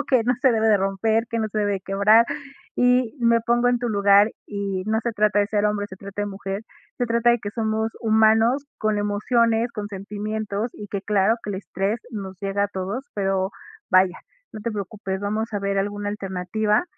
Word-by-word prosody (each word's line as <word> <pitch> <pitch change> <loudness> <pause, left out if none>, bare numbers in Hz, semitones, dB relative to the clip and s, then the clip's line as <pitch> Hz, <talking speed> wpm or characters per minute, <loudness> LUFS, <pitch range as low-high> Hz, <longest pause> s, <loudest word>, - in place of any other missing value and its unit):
o - - -2
que 250 -4 +2
no 250 +2 +2
se 260 - +6
debe 220 -1 +2
de 210 - +6
romper, 200 +4 +1
que 230 - -1
no 220 - 0
se 215 - -3
debe 205 -1 +1
de 195 - -4
quebrar, 200 +4 +4 0.5
y 250 -1 +3
me 235 -1 +4
pongo 240 +1 +2
en 245 -1 +2
tu 245 - -2
lugar, 200 0 +5 0.2
y 200 -2 -3
no 220 +1 +1
se 235 0 -1
trata 210 -1 +2
de 205 - +3
ser 210 0 0
hombre, 210 -1 0
se 190 - -10
trate 200 +1 -6
de - - -2
mujer, 195 +1 -5 0.4
se 245 - 0
trata 235 +1 +3
de 240 - +3
que 205 -2 -5
somos 220 0 -1
humanos 225 +4 +4
con 215 -1 0
emociones, 225 +3 +1
con 205 -2 -5
sentimientos, 210 +2 -4
y 205 - -9
que 200 - -3
claro 205 +2 +2
que 210 - -5
el 195 - -3
estrés 195 +3 -2
nos 195 -4 -6
llega 200 0 0
a 205 - -2
todos, 195 +7 -4
pero 195 -1 0 0.4
vaya, 185 -1 +4 0.3
no 215 - -7
te 230 +2 -3
preocupes. 195 -1 -4
Vamos 215 +2 -2
a 205 - 0
ver 200 0 -1
alguna 205 +1 -2
alternativa, 205 - -1
210 Hz, 210 wpm, -23 LUFS, 200-225 Hz, 0.5 s, se